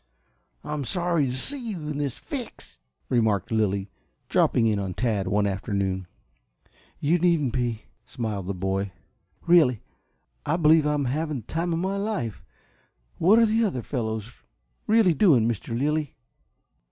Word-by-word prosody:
"I'm 150 Hz, -1 st, -3 dB
sorry 170 Hz, -1 st, 0 dB
to 125 Hz, -, -3 dB
see 270 Hz, -, -2 dB
you 160 Hz, -5 st, -6 dB
in 150 Hz, -1 st, -3 dB
this 140 Hz, -4 st, -2 dB
fix," -, -, -8 dB, 0.3 s
remarked 110 Hz, -6 st, +1 dB
Lilly, 100 Hz, -3 st, 0 dB, 0.4 s
dropping 115 Hz, -, +3 dB
in 105 Hz, -2 st, +2 dB
on 95 Hz, -2 st, -4 dB
Tad 110 Hz, -5 st, 0 dB
one 105 Hz, +1 st, +2 dB
afternoon. 95 Hz, -1 st, -2 dB, 0.9 s
"You 165 Hz, +5 st, +2 dB
needn't 160 Hz, -7 st, +2 dB
be," 120 Hz, -3 st, -1 dB, 0.2 s
smiled 105 Hz, -6 st, -4 dB
the 100 Hz, -, -2 dB
boy. 95 Hz, +1 st, -2 dB, 0.5 s
"Really, 155 Hz, -10 st, +4 dB, 0.6 s
I 155 Hz, +3 st, 0 dB
believe 155 Hz, -2 st, +5 dB
I'm 150 Hz, -2 st, 0 dB
having 150 Hz, +1 st, -2 dB
the -, -, -24 dB
time 170 Hz, +2 st, -2 dB
of 165 Hz, -, 0 dB
my 190 Hz, +3 st, -1 dB
life. 200 Hz, -, -3 dB, 0.8 s
What 195 Hz, +7 st, +5 dB
are 230 Hz, -, +6 dB
the 225 Hz, +1 st, +2 dB
other 150 Hz, -, -1 dB
fellows 110 Hz, -2 st, -3 dB, 0.5 s
really 215 Hz, -5 st, +5 dB
doing, 135 Hz, -, +4 dB
Mr. 115 Hz, 0 st, -3 dB
Lilly?" 150 Hz, +2 st, -1 dB
130 Hz, 145 wpm, -25 LUFS, 105-165 Hz, 0.9 s, are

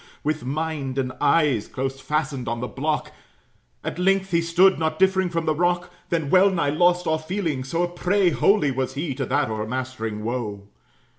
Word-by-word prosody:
With 155 Hz, +1 st, -1 dB
mind 140 Hz, -1 st, -3 dB
and 130 Hz, -1 st, -1 dB
eyes 145 Hz, -6 st, +3 dB
close 135 Hz, +1 st, -4 dB
fastened 140 Hz, -5 st, -2 dB
on 115 Hz, 0 st, -2 dB
the 125 Hz, -, -3 dB
block, 150 Hz, +4 st, -2 dB, 0.7 s
At -, -, -4 dB
length 195 Hz, +1 st, +2 dB
he 170 Hz, -1 st, +3 dB
stood, 175 Hz, +3 st, +4 dB
not 160 Hz, -1 st, -1 dB
differing 190 Hz, 0 st, +3 dB
from 165 Hz, -1 st, -2 dB
the 155 Hz, -, +2 dB
rock. 175 Hz, +2 st, 0 dB, 0.2 s
Then 160 Hz, -4 st, -1 dB
well 190 Hz, +1 st, +6 dB
nigh 170 Hz, -7 st, 0 dB
lost 175 Hz, +3 st, +3 dB
all 160 Hz, -1 st, +1 dB
feeling; 160 Hz, -5 st, -2 dB
so 165 Hz, +6 st, -1 dB
a -, -, +1 dB
prey 180 Hz, +1 st, +1 dB
Wholly 180 Hz, -3 st, +3 dB
was 130 Hz, 0 st, -3 dB
he 145 Hz, 0 st, -2 dB
to 130 Hz, -1 st, -3 dB
that -, -, +1 dB
o'ermastering 110 Hz, -1 st, -4 dB
woe. 110 Hz, -4 st, -4 dB
155 Hz, 180 wpm, -23 LUFS, 130-175 Hz, 0.7 s, well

